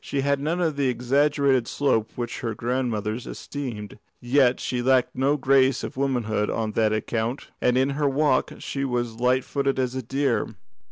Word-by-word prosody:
She 140 - -2
had 140 0 +1
none 160 +5 -1
of 160 -5 0
that 140 - +1
exaggerated 135 0 +2
slope 115 -6 +1
which 120 0 -5
our 115 -2 -2
grandmothers 120 -2 -2
esteemed, 120 -8 -6 0.2
yet 125 0 +3
she 125 -1 -2
lacked 130 0 +2
no 135 +3 +2
grace 135 -1 +3
of - - -5
womanhood 120 -6 0
on 110 -1 -1
that 110 0 +2
account, 115 +4 -2
and 125 0 +3
in 135 +2 +2
her 145 0 +1
walk 145 +2 +2
she 140 - -4
was 120 -3 -2
light 125 +1 +2
footed 140 -1 -1
as 130 -1 0
a 130 - -3
deer. 135 +4 -1
130 Hz, 175 wpm, -24 LUFS, 120-140 Hz, 0.2 s, yet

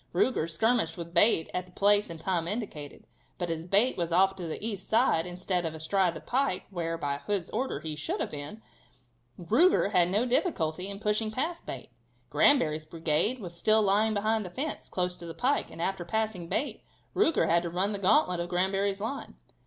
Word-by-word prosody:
Ruger 170 -11 +1
skirmished 225 +7 +1
with 170 -1 -7
Bate 170 -2 +4
at 180 0 -3
the - - -18
place 205 +2 +3
and 165 -1 -8
time 170 -1 -1
indicated, 180 -9 -5 0.3
but 175 -2 -2
as 165 0 -4
Bate 205 +7 +3
was 170 -1 -2
off 190 +3 +4
to 175 -3 -5
the 160 - -4
east 200 -4 -4
side, 220 -8 +3
instead 180 0 -2
of 160 -1 -3
astride 170 +2 +1
the - - -6
pike, 250 - 0
where, 165 -2 -2
by 140 -3 -2
Hood's 195 +2 -3
order 235 - -2
he 155 -1 -5
should 150 0 -3
have - - -2
been, 150 +10 -8 0.7
Ruger 225 - +3
had 180 -3 +3
no 210 +6 +1
difficulty 185 - 0
in 200 - -6
pushing 215 +1 0
past 315 +10 -3
Bate. - - -7 0.4
Granbury's 155 - +3
brigade 165 +9 0
was 175 -5 -7
still 215 +5 +3
lying 210 +2 +2
behind 215 +2 +1
the 180 - -7
fence, 285 - -5
close 180 -1 0
to 170 - -9
the 165 - -7
pike, 265 +10 0
and - - -12
after 185 +1 -2
passing 185 -2 -2
Bate, 290 - -2 0.3
Ruger 330 -6 +3
had 170 +1 +3
to 170 - -4
run 185 +4 0
the 200 - -2
gantlet 185 -2 +3
of 175 0 -3
Granbury's 195 +2 0
line. 250 +6 -5
185 Hz, 200 wpm, -29 LUFS, 170-215 Hz, 0.7 s, Bate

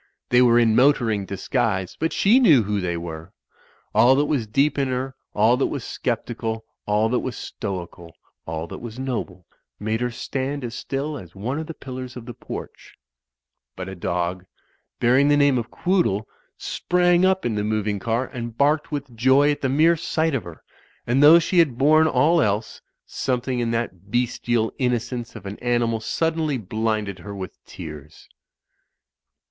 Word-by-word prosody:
They 125 0 +5
were 120 -1 +5
in 115 -2 +4
motoring 120 -7 +3
disguise, 100 -2 -1
but 160 +1 0
she 225 +6 +4
knew 155 - +6
who 105 0 -1
they 85 -2 -2
were. 80 -1 -7 0.6
All 130 +2 +6
that 145 +2 +2
was 140 -7 -1
deep 140 +6 +1
in 135 - +1
her, 130 +1 -3 0.2
all 110 +4 +4
that 135 - +1
was 140 -5 -4 0.2
sceptical, 115 -2 -2 0.2
all 105 +1 +2
that 125 - +1
was 130 -3 -5
stoical, 85 -4 -6 0.3
all 80 0 -3
that - - -8
was 120 -1 -8
noble, 115 -9 -4 0.3
made 110 +2 -2
her 125 - 0
stand 135 +3 -4
as 120 -1 -5
still 140 +4 -4
as 90 -3 -13
one 120 +9 -3
of 160 - -5
the 165 - -7
pillars 130 -1 -7
of 120 - -9
the 120 - -7
porch; - - -9 0.8
but 95 0 -6
a 95 - -6
dog, 90 0 -2 0.6
bearing 130 +4 +4
the 145 0 +4
name 140 -3 +4
of 115 - -5
Quoodle, 175 - 0 0.3
sprang 175 0 +1
up 190 0 +2
in 120 - 0
the 105 -1 -1
moving 105 -1 -1
car, 115 +5 -1
and 120 -3 -7
barked 150 +3 +2
with 140 -4 -5
joy 130 +5 +4
at 145 - -3
the 135 - 0
mere 160 +5 +4
sight 160 -1 -1
of 135 - -1
her, 85 -2 -11 0.4
and 125 +4 +2
though 150 +3 +9
she 170 +2 +2
had 145 -8 +3
borne 155 +4 +5
all 155 +5 +3
else, 105 0 -1 0.2
something 125 -1 -2
in 120 -1 0
that 105 -5 -3
bestial 120 -1 0
innocence 120 -1 -2
of 105 -4 -10
an 100 +1 -7
animal 120 -2 0
suddenly 160 +4 -1
blinded 110 -2 -2
her 100 +4 -8
with 95 -1 -8
tears. 75 +1 -10
120 Hz, 175 wpm, -23 LUFS, 105-140 Hz, 0.8 s, though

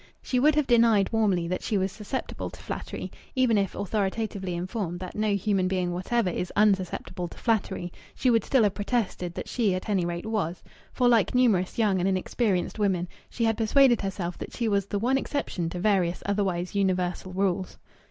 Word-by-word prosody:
She 250 - 0
would 295 +3 +4
have 300 -2 +2
denied 230 -5 +4
warmly 195 -6 +2
that 185 +1 -2
she 210 - 0
was 190 0 0
susceptible 210 +6 -5
to - - -13
flattery; - - -6 0.2
even 255 -3 +3
if 200 -2 0
authoritatively 200 -2 -2
informed 180 -1 -3
that 185 0 -7
no 210 -1 +1
human 195 -2 +1
being 185 -1 0
whatever 185 +3 0
is 180 +1 -3
unsusceptible 190 -3 +1
to - - -13
flattery, 195 -6 -1 0.2
she 255 - +2
would 225 -3 +3
still 265 -5 +3
have 205 -2 +2
protested 200 -5 -2
that - - -5
she 215 -7 +1
at 185 +4 -5
any 195 -4 +2
rate 170 +1 -3
was, 200 -6 -2 0.3
for, 250 - +2
like 235 -1 +3
numerous 215 -8 +2
young 205 -5 +2
and 185 +2 +1
inexperienced 190 +1 0
women, 185 -4 +1 0.2
she 235 - -3
had 225 -1 +1
persuaded 240 +2 +4
herself 190 -3 -4
that - - -7
she 235 - -1
was 200 -2 +1
the 205 - -2
one 255 +6 +2
exception 190 - -3
to 180 - -5
various 180 -3 +1
otherwise 190 -3 -1
universal 185 -2 0
rules. 190 0 -1
200 Hz, 190 wpm, -27 LUFS, 180-225 Hz, 0.3 s, would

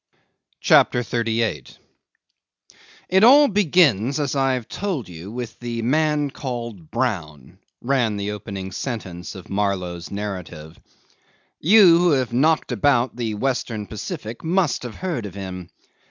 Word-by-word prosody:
CHAPTER 125 - +4
38 115 - -2 1.3
'It 190 +2 +4
all 285 +5 +8
begins, 155 - +3
as 145 -1 -1
I've 130 -3 0
told 180 - -3
you, 90 +3 -9
with 120 -1 -6
the 120 -1 -4
man 150 +2 +1
called 120 - -6
Brown,' 90 - -3 0.2
ran 120 -5 +1
the 100 +1 -3
opening 100 -2 -6
sentence 95 -7 -6
of 95 - -10
Marlow's 90 -4 -2
narrative. 90 -6 -7 0.8
'You 180 -1 +7
who 175 0 +3
have 130 -3 0
knocked 155 +6 +2
about 130 -4 +2
the 115 -3 -3
Western 115 -3 -2
Pacific 110 +2 -7
must 165 -5 +1
have 120 -3 -7
heard 165 - -3
of 95 - -11
him. 90 -3 -7
115 Hz, 125 wpm, -22 LUFS, 100-140 Hz, 1.3 s, all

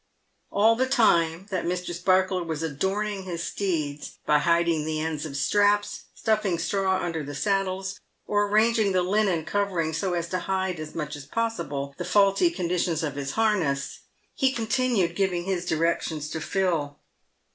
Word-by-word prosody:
All 220 +3 +4
the 260 +2 +1
time 170 -9 +3
that 185 -2 -1
Mr. 180 0 -2
Sparkler 185 +1 +2
was 160 -2 -4
adorning 195 +7 -1
his 175 -3 -5
steeds, 155 -8 -3
by 150 0 +4
hiding 170 0 +2
the 155 0 -2
ends 155 -1 -2
of 140 -2 -6
straps, 205 +5 +2
stuffing 215 -5 +1
straw 190 +1 0
under 170 -4 -3
the 145 0 -7
saddles, 195 +2 -1 0.3
or 205 0 +1
arranging 215 -1 +3
the 185 -1 +2
linen 190 -4 +1
covering 185 -6 -1
so 175 +3 -1
as 170 -1 -2
to 185 - -1
hide, 190 -3 -2
as 155 0 -7
much 150 -2 -3
as 140 -1 -10
possible, 160 -10 -2
the - - -2
faulty 200 - +4
condition 180 - -1
of 145 - -5
his 140 -1 -4
harness, 190 -12 0 0.3
he 265 -1 +2
continued 230 -7 0
giving 185 -3 0
his 180 -1 -2
directions 160 -2 -1
to 160 - -4
Phil. 165 -8 -1
180 Hz, 160 wpm, -26 LUFS, 160-200 Hz, 0.3 s, All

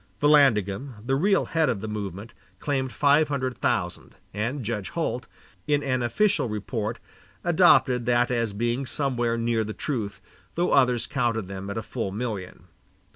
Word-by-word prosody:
Vallandigham, 135 -5 +3
the 135 - 0
real 195 +7 +2
head 160 -2 +1
of 105 - -1
the 110 - -5
movement, 105 0 -5 0.2
claimed 135 -3 -1
five 145 +3 +4
hundred 130 -3 -2
thousand, 90 -7 -2 0.2
and 115 +5 -2
Judge 105 -4 -3
Holt, 130 -7 -3 0.4
in 145 -1 +2
an 130 -2 0
official 190 - +1
report, 105 +1 -3 0.5
adopted 125 -2 +4
that 120 0 +3
as 115 -3 0
being 120 +5 -1
somewhere 120 -5 -1
near 115 -1 +1
the 110 0 -5
truth, 110 -9 -3 0.4
though 175 +1 +1
others 125 -3 +3
counted 120 -8 -1
them 95 0 -6
at 100 - -4
a 110 - -3
full 110 -4 -4
million. 100 -5 -5
120 Hz, 155 wpm, -25 LUFS, 105-135 Hz, 0.5 s, five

